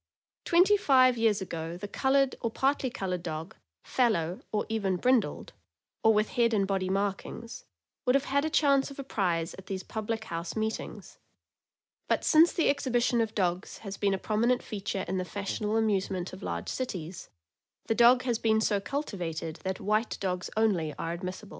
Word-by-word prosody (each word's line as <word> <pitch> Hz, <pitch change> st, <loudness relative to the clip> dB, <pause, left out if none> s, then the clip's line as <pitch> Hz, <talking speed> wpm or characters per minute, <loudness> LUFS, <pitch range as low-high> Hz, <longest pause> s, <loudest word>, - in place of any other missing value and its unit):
Twenty 365 Hz, +4 st, +5 dB
five 255 Hz, -8 st, +5 dB
years 225 Hz, -3 st, +2 dB
ago 165 Hz, -1 st, -5 dB
the 205 Hz, +3 st, -6 dB
colored 270 Hz, +4 st, +2 dB
or 230 Hz, -, 0 dB
partly 270 Hz, +3 st, 0 dB
colored 185 Hz, -6 st, -3 dB
dog, 160 Hz, -1 st, -5 dB, 0.3 s
fallow, 185 Hz, -9 st, +1 dB
or 210 Hz, -, 0 dB
even 200 Hz, -4 st, 0 dB
brindled, 250 Hz, +2 st, +1 dB, 0.5 s
or 220 Hz, -, +6 dB
with 215 Hz, 0 st, +2 dB
head 235 Hz, -2 st, +2 dB
and 200 Hz, -2 st, +2 dB
body 190 Hz, -1 st, -1 dB
markings, 200 Hz, +4 st, -3 dB, 0.4 s
would 250 Hz, -, +4 dB
have 275 Hz, +1 st, +2 dB
had 280 Hz, +1 st, +1 dB
a 315 Hz, -, 0 dB
chance 280 Hz, -3 st, +3 dB
of 275 Hz, -, -11 dB
a 275 Hz, -, -5 dB
prize 175 Hz, -9 st, -1 dB
at 195 Hz, -, -13 dB
these 190 Hz, -1 st, -4 dB
public 220 Hz, 0 st, -4 dB
house 170 Hz, -2 st, -5 dB
meetings; 220 Hz, 0 st, -4 dB, 0.9 s
but -, -, +1 dB
since 325 Hz, +2 st, +6 dB
the 335 Hz, -, +1 dB
exhibition 245 Hz, -4 st, +2 dB
of 225 Hz, -1 st, -2 dB
dogs 180 Hz, -2 st, -1 dB
has 195 Hz, 0 st, -5 dB
been 200 Hz, -1 st, +1 dB
a -, -, -2 dB
prominent 230 Hz, +5 st, +1 dB
feature 195 Hz, -2 st, -4 dB
in 185 Hz, +1 st, -1 dB
the -, -, -1 dB
fashionable 205 Hz, +3 st, -2 dB
amusements 195 Hz, -4 st, 0 dB
of 185 Hz, -, -9 dB
large 85 Hz, 0 st, -4 dB
cities, 185 Hz, -9 st, -5 dB, 0.6 s
the -, -, +1 dB
dog 240 Hz, +2 st, +6 dB
has 240 Hz, -3 st, 0 dB
been 220 Hz, -1 st, +3 dB
so 210 Hz, -2 st, +1 dB
cultivated 175 Hz, -, -4 dB
that 190 Hz, 0 st, -4 dB
white 215 Hz, +3 st, 0 dB
dogs 180 Hz, -2 st, -2 dB
only 180 Hz, -9 st, +1 dB
are 165 Hz, +4 st, -3 dB
admissible. 185 Hz, +4 st, -6 dB
210 Hz, 175 wpm, -29 LUFS, 185-245 Hz, 0.9 s, or